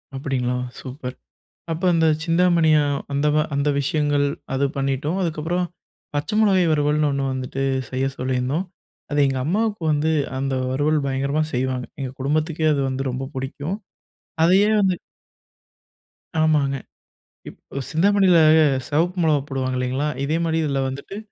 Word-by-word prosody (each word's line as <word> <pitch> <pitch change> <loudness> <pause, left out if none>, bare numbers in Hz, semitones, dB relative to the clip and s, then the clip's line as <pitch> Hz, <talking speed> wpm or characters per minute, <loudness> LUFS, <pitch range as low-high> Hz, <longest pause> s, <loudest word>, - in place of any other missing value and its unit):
அப்டிங்களா? 130 -2 -1 0.2
சூப்பர். 130 -1 -7 0.6
அப்போ 165 +3 -2
அந்தச் 160 -2 +2
சிந்தாமணிய 165 -2 +4 0.4
அந்த 140 +2 +1 0.3
அந்த 140 +1 +1
விஷயங்கள் 145 0 +1 0.3
அது 135 +1 +1
பண்ணிட்டோம். 140 +5 -1
அதுக்கப்றம் 170 +1 -1 0.5
பச்ச 145 +1 -2
மிளகாய் 190 -5 +4
வறுவல்ன்னு 150 0 +2
ஒண்ணு 140 0 -1
வந்துட்டு 130 +1 -3 0.3
செய்யச் 135 +1 -2
சொல்லிருந்தோம். 130 +6 -1 0.5
அது 145 - +1
எங்க 135 -1 -1
அம்மாவுக்கு 210 +4 0
வந்து, 150 +1 +1 0.3
அந்த 135 0 -1 0.2
வறுவல் 150 +3 +1
பயங்கரமா 140 +3 0
செய்வாங்க. 130 0 -1
எங்க 130 -2 -3
குடும்பத்துக்கே 155 +3 0
அது 140 - 0
வந்து 130 +1 -2
ரொம்ப 130 +2 -4
புடிக்கும். 145 +7 -4 0.7
அதயே 190 +5 +5
வந்து 190 -2 +3 1.5
ஆமாங்க. 145 -3 +2 0.7
இப்ப 140 - -8
சிந்தாமணில 190 +1 +4 0.5
செவப்பு 170 +5 +1
மிளகாய் 145 -3 +2
போடுவாங்க 130 -2 -2
இல்லீங்களா? 130 +3 -1 0.2
இதே 155 +4 0
மாரி 160 -1 0
இதுல 140 -3 0
வந்துட்டு 140 +9 -7
145 Hz, 125 wpm, -22 LUFS, 135-160 Hz, 1.5 s, அதயே